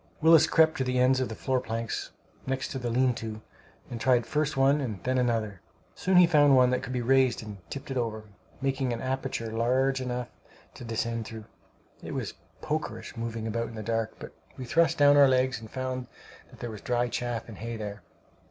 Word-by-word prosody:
Willis 160 0 +6
crept 160 -1 +4
to - - +2
the 125 0 -1
ends 130 +1 +4
of 130 - -1
the 110 - -5
floor 130 +2 0
planks, 115 -2 -4 0.4
next 135 0 -2
the 125 -3 -3
lean 125 +2 +2
to, 110 -1 -6 0.5
and 115 -2 -5
tried 125 -2 +3
first 150 +2 -1
one 140 +2 +4
and 110 -8 -4
then 130 0 +1
another. 110 -6 -1 0.3
Soon 185 0 +1
he 180 - +9
found 145 -4 +5
one 125 -1 +5
that 125 - 0
could - - -6
be 125 -1 -1
raised 130 -1 +3
and 105 -2 -8
tipped 140 +1 -7
it 135 - -2
over, 110 -3 -2 0.4
making 135 -1 0
an 115 - -2
aperture 130 -3 -3
large 130 +4 +1
enough 125 -1 -3 0.5
to - - -10
descend 115 0 -2
through. 110 -1 -8 0.6
It - - -6
was - - -3 0.3
"pokerish" - - -4
moving 115 -1 -4
about 115 +1 -2
in 115 - -10
the 110 - -5
dark; 115 0 -2
but - - -10 0.2
we 130 - -6
thrust 165 +7 +2
down 145 0 +6
our 140 -1 +8
legs 130 -1 +2
and 110 -1 -11
found 130 0 -4 0.4
that - - -16
there 120 - -4
was 110 - -9
dry 120 0 0
chaff 120 -1 -3
and 110 -4 -10
hay 115 +1 -5
there. 105 -1 -6
125 Hz, 210 wpm, -28 LUFS, 115-135 Hz, 0.6 s, he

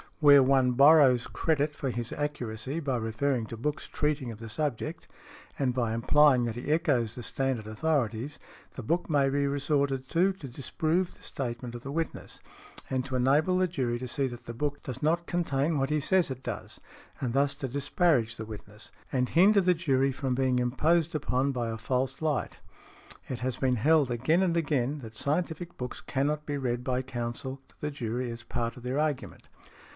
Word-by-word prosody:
Where 145 -3 +8
one 130 -1 +4
borrows 140 -3 +6
credit 150 -2 0
for 135 - -2
his 120 -1 -3
accuracy, 135 -1 -3
by 135 -5 -1
referring 115 +2 -1
to 115 - -7
books 150 +6 -3
treating 150 -5 -1
of 110 - -10
the 115 -1 -8
subject, 150 +4 -3 0.5
and 130 -3 +1
by 120 -3 0
implying 130 +2 +4
that 115 -2 -3
he 125 +4 -3
echoes 135 -9 +2
the 120 - -6
standard 130 -3 -1
authorities, 125 +1 -1 0.4
the 130 - -7
book 170 +11 -1
may 140 -3 +3
be 140 +1 +1
resorted 140 -2 0
to, 185 +3 +3
to 170 -7 -9
disprove 160 +7 -1
the - - -19
statement 120 -3 -4
of 120 - -7
the 135 - -6
witness, 165 +2 -4 0.5
and 130 -1 0
to 130 -1 -4
enable 145 +8 +3
the 185 0 +3
jury 130 -8 -1
to 130 - -5
see 135 +3 0
that 120 -1 -9
the 120 - -6
book 145 +3 -2
does 130 -1 -6
not 170 +3 +2
contain 155 -3 0
what 135 0 0
he 155 - +2
says 185 +4 +2
it 130 0 -6
does, - - -6 0.4
and 125 -3 -2
thus 140 +1 +2
to 135 - -4
disparage 140 - +1
the 110 - -5
witness, 105 -1 -9 0.2
and 125 -1 +1
hinder 200 +4 +5
the 180 -1 +3
jury 135 -5 +2
from 130 0 -2
being 130 -1 +2
imposed 155 +7 +2
upon 140 -2 0
by 120 -3 -2
a 115 - -3
false 125 +5 -1
light. 150 -5 -1 0.7
It 125 - -4
has 130 0 -2
been 130 -2 +1
held 145 +3 +3
again 130 +9 +2
and 175 -3 +2
again 145 -3 0
that 110 -4 -10
scientific 165 +4 -2
books 125 -1 -5
cannot 150 +2 -1
be 145 -1 -1
read 125 -2 -2
by 130 0 -1
counsel 125 +1 -5
to - - -26
the 150 - -2
jury 120 -2 -3
as 115 0 -7
a - - -31
part 115 0 -2
of 125 - -11
their 130 +3 -1
argument. 150 -4 -2
135 Hz, 195 wpm, -29 LUFS, 120-150 Hz, 0.7 s, Where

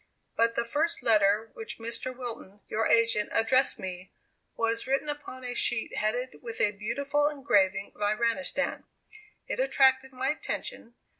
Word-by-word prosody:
But 230 0 +2
the 235 - 0
first 300 +4 0
letter 215 -1 +3
which 445 -1 -6
Mr. 230 +2 -3
Wilton, 225 -5 -8
your 225 +1 0
agent, 230 -2 +3
addressed 255 +4 +3
me, 185 -2 -7 0.4
was 230 +1 0
written 275 +3 0
upon 290 -3 -4
a 245 0 -3
sheet 240 -1 0
headed 245 +4 -1
with 230 -2 -7
a 205 - +3
beautiful 280 +8 0
engraving 200 -10 +1
of - - -18
Iranistan. 230 +6 0 0.6
It - - -3
attracted 265 - +3
my 260 +1 -2
attention. 240 -5 -4
235 Hz, 145 wpm, -28 LUFS, 215-265 Hz, 0.6 s, letter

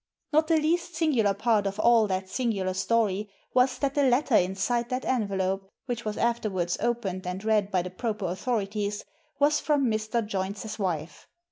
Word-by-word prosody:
Not 310 +1 +4
the 325 -1 +4
least 335 +2 0
singular 255 - +2
part 210 -1 +2
of 195 +2 -4
all 230 -2 +5
that 190 -1 -2
singular 195 -4 -1
story 210 0 0 0.2
was 255 0 +3
that 275 0 -1
the 290 - +2
letter 260 0 +2
inside 200 +7 +1
that 255 0 -2
envelope, 195 -5 -1 0.2
which 240 -3 -4
was 210 -1 -3
afterwards 210 -7 0
opened 205 -6 -2
and 185 +2 -4
read 210 -2 +2
by 185 -3 +1
the 180 - -6
proper 215 0 -3
authorities, 205 +1 -2 0.3
was 295 +1 +3
from 290 -3 +1
Mr. 215 +1 -1
Joynes's 205 +2 -4
wife. 160 -5 -3
215 Hz, 165 wpm, -27 LUFS, 195-250 Hz, 0.3 s, all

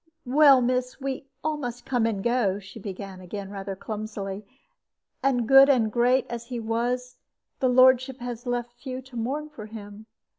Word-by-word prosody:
"Well, 275 0 +6
miss, 250 +1 -1
we 270 0 -4 0.2
all 310 0 0
must 245 -3 -6
come 245 -4 +1
and 200 -4 -2
go," 235 -5 +1
she 195 +2 -11
began 195 -2 -7
again, 195 +2 -7
rather 195 -1 -5
clumsily; 210 -1 -5 0.8
"and, 245 -4 +1
good 270 +1 +8
and 235 -6 +3
great 250 +3 +3
as 235 0 -6
he 245 -1 -4
was, 240 +3 -2 0.4
his 260 - +2
lordship 260 +1 +5
has 245 0 -6
left 240 -1 -2
few 255 +1 -7
to 260 -1 -15
mourn 270 +7 -2
for 215 -6 -9
him. 210 0 -10
240 Hz, 170 wpm, -26 LUFS, 215-255 Hz, 0.8 s, good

